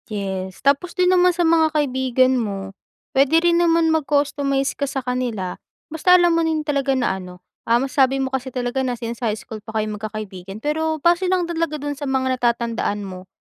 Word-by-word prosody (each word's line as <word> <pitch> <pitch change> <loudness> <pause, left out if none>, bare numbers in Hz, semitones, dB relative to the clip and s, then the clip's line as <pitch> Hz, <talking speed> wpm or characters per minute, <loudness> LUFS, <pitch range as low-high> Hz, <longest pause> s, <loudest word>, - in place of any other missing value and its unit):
Yes, 190 -2 -5
tapos 280 +6 +1
din 365 0 +4
naman 360 0 +5
sa 350 -1 +1
mga 320 -1 +3
kaibigan 260 -2 +2
mo 195 -3 -5 0.4
pwede 275 +4 +4
rin 340 0 +4
naman 330 -1 +3
mag-customize 285 -2 0
ka 280 - -3
sa 270 -1 -3
kanila, 245 -7 -3 0.3
basta 325 +3 +4
alam 350 -1 +5
mo 335 0 +2
din 315 -1 0
talaga 280 -2 0
na 240 -7 0
ano, 180 -1 -11 0.2
um, 235 +2 +3
sabi 270 0 +3
mo 265 - -3
kasi 265 0 -3
talaga 245 +1 -2
na 250 - -1
since 235 -1 -6
sa 240 - -1
high 210 - -1
school 220 0 -9
pa 220 +1 -11
kayo 215 - 0
magkakaibigan 200 -2 -7
pero 315 +1 0
base 345 +2 +3
lang 370 -1 +2
dalaga 330 -2 -2
dun 290 0 -4
sa 285 0 -6
mga 260 -1 +1
natatandaan 235 -3 -1
mo, 185 -1 -9
265 Hz, 195 wpm, -21 LUFS, 220-315 Hz, 0.4 s, naman